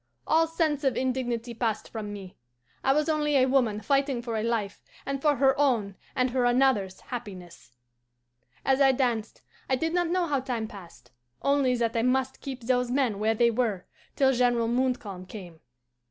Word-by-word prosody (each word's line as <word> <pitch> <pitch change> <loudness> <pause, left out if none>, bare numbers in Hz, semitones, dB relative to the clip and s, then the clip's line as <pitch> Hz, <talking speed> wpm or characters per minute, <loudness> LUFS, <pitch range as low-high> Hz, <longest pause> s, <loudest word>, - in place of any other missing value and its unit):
All 325 +1 +3
sense 315 -3 0
of 270 -2 +1
indignity 245 -2 -2
passed 225 -2 -2
from 215 -2 -5
me. 195 -3 -9 0.5
I 270 - +3
was 300 +2 +2
only 300 -2 +1
a 255 - +5
woman 245 -6 +1
fighting 275 +1 0
for 235 -2 -3
a 215 - 0
life 220 -3 -2 0.2
and 275 -1 -3
for 295 -1 +3
her 265 0 +3
own 230 -9 +1 0.2
and 255 -1 +1
her 255 0 +1
another's 245 -7 +2
happiness. 185 - -9 0.9
"As 270 +1 +3
I 270 -1 +6
danced 240 -4 -1 0.3
I 260 - +3
did 325 +5 -2
not 350 -1 +1
know 355 +1 +1
how 290 -4 0
time 245 -4 -3
passed 190 -10 -13 0.3
only 275 -3 +2
that 235 -1 -1
I 230 - +2
must 260 +2 0
keep 265 -2 -6
those 250 +1 +1
men 250 -6 0
where 220 +1 +1
they 235 +1 +3
were 220 -6 -1 0.3
till 265 -1 +4
General 240 -2 +2
Montcalm 235 -7 -2
came. 180 -5 -10
250 Hz, 180 wpm, -27 LUFS, 220-270 Hz, 0.9 s, I